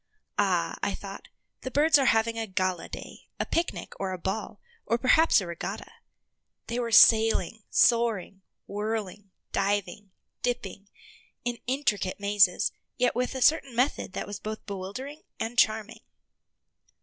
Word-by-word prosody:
Ah, - - +1
I - - -1
thought, - - -9 0.3
the 260 - -4
birds 295 +3 +4
are 270 - +2
having 225 0 +3
a 225 -1 -3
gala 185 -2 -2
day, - - -10
a - - 0
picnic, 335 +1 -2
or 195 -1 -2
a - - -4
ball, 195 +3 -4 0.3
or 230 - +2
perhaps 315 +6 +5
a 195 - -4
regatta. 170 -1 -6 0.7
They 235 +1 -3
were 235 -1 -2
sailing, 225 0 +5
soaring, 225 -5 +2 0.2
whirling, 205 -1 -4 0.2
diving, 200 0 -1 0.3
dipping, 205 -5 -3 0.6
in 240 -1 -2
intricate 230 -9 -1
mazes, 200 -2 +3 0.3
yet 245 -1 +2
with 250 +2 -1
a 260 - 0
certain 275 -5 +3
method 250 -5 0
that - - -4
was 205 0 -7
both 215 0 -6
bewildering 210 +10 -6 0.2
and 230 +2 -3
charming. 220 -2 +1
220 Hz, 140 wpm, -27 LUFS, 200-245 Hz, 0.7 s, perhaps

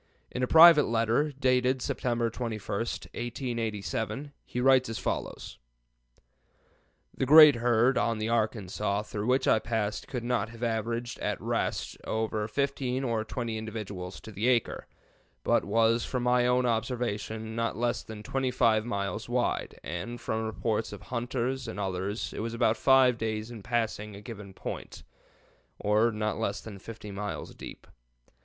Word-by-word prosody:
In 125 - -3
a 125 - +2
private 160 -1 +8
letter, 115 +6 +1
dated 130 -1 +2
September 120 -2 -1
21, 115 -2 -4 0.2
1887, 115 - -3
he 125 - -4
writes 130 -1 +4
as 115 - -3
follows: - - -4 1.6
"The 130 - -1
great 150 -2 +9
herd 120 +2 +3
on 115 +1 +1
the 110 +1 -2
Arkansas 105 -3 -1
through 105 +1 -4
which 130 +1 +2
I 110 - +5
passed 105 -2 -2
could 125 -4 -4
not 120 -3 0
have 115 +1 -9
averaged, 115 +1 -2
at - - -2
rest, - - -2
over 110 -1 -1
fifteen 135 +2 -1
or 115 -4 0
twenty 115 -1 -4
individuals 105 -4 -6
to 110 - -10
the 105 +4 -1
acre, 125 -3 +1 0.6
but - - +3
was, 115 +4 +2
from 125 -2 -2
my 125 0 +3
own 125 0 +3
observation, 110 -2 -2
not 115 -1 -1
less 120 -1 0
than 110 -1 -9
25 125 -4 +2
miles 100 -5 -3
wide, - - -1
and 85 +9 -5
from 110 -1 -2
reports 110 0 -2
of - - -9
hunters 125 +1 -2
and 110 - -5
others 95 +2 -3
it - - -6
was 115 +1 -3
about 115 -2 +3
five 130 -1 +5
days 110 0 -3
in 115 -3 -8
passing 110 -2 -2
a 100 - -10
given 105 -3 -8
point, - - -7 0.7
or 105 +3 +2
not 105 0 -2
less 100 - -1
than 105 -3 -9
50 105 0 -9
miles 105 +1 -5
deep. - - -10
115 Hz, 150 wpm, -29 LUFS, 110-125 Hz, 1.6 s, great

